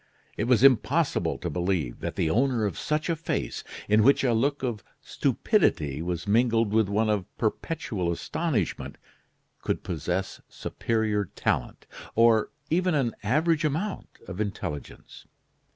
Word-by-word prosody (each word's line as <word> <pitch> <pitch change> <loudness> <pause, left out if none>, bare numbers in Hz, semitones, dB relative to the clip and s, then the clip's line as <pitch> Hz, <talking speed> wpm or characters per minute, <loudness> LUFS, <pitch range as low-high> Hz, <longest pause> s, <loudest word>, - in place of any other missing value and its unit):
It 105 - -1
was 125 0 +3
impossible 135 - +3
to 85 +2 -4
believe 85 -7 -1
that - - -4
the - - +1
owner 120 +4 +2
of 100 -5 -2
such 155 0 -1
a 170 - +1
face, 160 - -3 0.2
in 105 +1 +4
which 135 +6 +5
a 125 -3 +3
look 140 +5 0
of 115 -6 -2 0.2
stupidity 75 -1 +1
was 85 0 -3
mingled 115 0 +2
with 110 -2 +3
one 110 +2 +1
of 105 -4 0
perpetual 110 - -2
astonishment, 120 - -2 0.6
could - - -2
possess 90 +3 -3
superior 110 -3 -1
talent, - - -1 0.3
or 115 -1 +4 0.2
even 180 0 +2
an 125 -6 +1
average 155 - +2
amount 160 +7 -2 0.2
of 95 +2 -4
intelligence. 75 -9 -6
110 Hz, 135 wpm, -27 LUFS, 95-140 Hz, 0.6 s, which